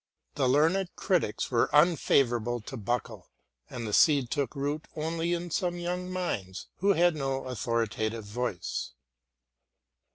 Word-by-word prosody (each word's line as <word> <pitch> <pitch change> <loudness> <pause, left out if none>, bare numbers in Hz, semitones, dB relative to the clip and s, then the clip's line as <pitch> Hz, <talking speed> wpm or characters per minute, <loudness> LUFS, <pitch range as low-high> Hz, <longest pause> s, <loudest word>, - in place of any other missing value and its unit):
The 135 -3 +1
learned 165 +7 +3
critics 175 - 0
were 115 -2 +2
unfavourable 130 -7 +3
to 120 - -8
Buckle, 115 -3 -3 0.4
and 120 -2 -5
the 105 - -4
seed 140 -4 +4
took 140 -3 -1
root 145 +2 -3
only 165 +2 -2
in 175 0 -3
some 175 0 0
young 180 +1 -3
minds 105 - -4
who 200 +2 +3
had 175 -1 +3
no 135 -2 -2
authoritative 115 -2 -2
voice. 110 -2 -3
135 Hz, 130 wpm, -29 LUFS, 115-170 Hz, 0.4 s, seed